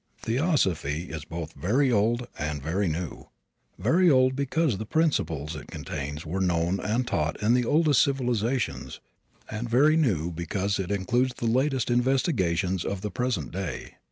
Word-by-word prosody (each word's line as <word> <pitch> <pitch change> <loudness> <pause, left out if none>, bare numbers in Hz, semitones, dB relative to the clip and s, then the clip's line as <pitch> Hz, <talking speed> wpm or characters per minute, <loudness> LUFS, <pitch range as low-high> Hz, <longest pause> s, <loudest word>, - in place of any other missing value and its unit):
Theosophy 95 - 0
is 80 -2 -6
both 80 -1 -6
very 130 +8 +1
old 115 +3 +2
and 75 -1 -2
very 90 +8 -1
new 80 +1 -4 0.5
very 170 - +3
old 130 -2 +4
because 140 - 0
the 110 - -4
principles 80 - 0
it 75 - -8
contains 75 0 -6
were 90 +5 -2
known 90 +1 +1
and 115 +6 0
taught 75 0 -1
in 110 +3 +4
the 125 -1 +2
oldest 150 +1 +4
civilizations, 125 -2 -1 0.5
and 110 +2 -5
very 145 +6 +5
new 95 - +1
because 95 +5 -2
it 95 -2 -3
includes 120 +6 0
the 120 - -4
latest 130 +2 +1
investigations 100 - +1
of 100 -1 -3
the 105 0 -4
present 120 - -2
day. 90 -6 -5
105 Hz, 155 wpm, -26 LUFS, 85-130 Hz, 0.5 s, very